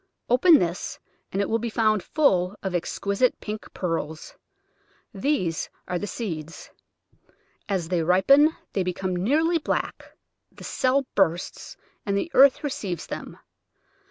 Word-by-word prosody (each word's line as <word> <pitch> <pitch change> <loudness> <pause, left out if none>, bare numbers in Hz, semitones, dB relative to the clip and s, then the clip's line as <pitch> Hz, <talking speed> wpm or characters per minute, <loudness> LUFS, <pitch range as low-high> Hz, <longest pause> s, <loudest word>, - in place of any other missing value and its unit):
Open 315 +6 +7
this 175 -5 -2 0.3
and 195 - -2
it - - -2
will 225 - 0
be 235 +1 -3
found 215 -2 +2
full 190 - +1
of 190 -2 -3
exquisite 200 +7 0
pink 215 0 -7
pearls; 165 -3 -4 0.8
these 195 - -1 0.2
are 180 - -2
the 205 - -4
seeds. 165 -8 -6 1.0
As 185 -5 -1
they 180 -2 +1
ripen 275 - +5 0.2
they 195 - 0
become 185 0 -2
nearly 310 - +2
black, - - -4 0.3
the - - -14
cell 265 +1 +1
bursts, 175 -3 -1 0.3
and 200 -1 -1
the 325 - -2
earth 275 +2 +6
receives 200 - -3
them. - - -7
200 Hz, 130 wpm, -25 LUFS, 180-260 Hz, 1.0 s, Open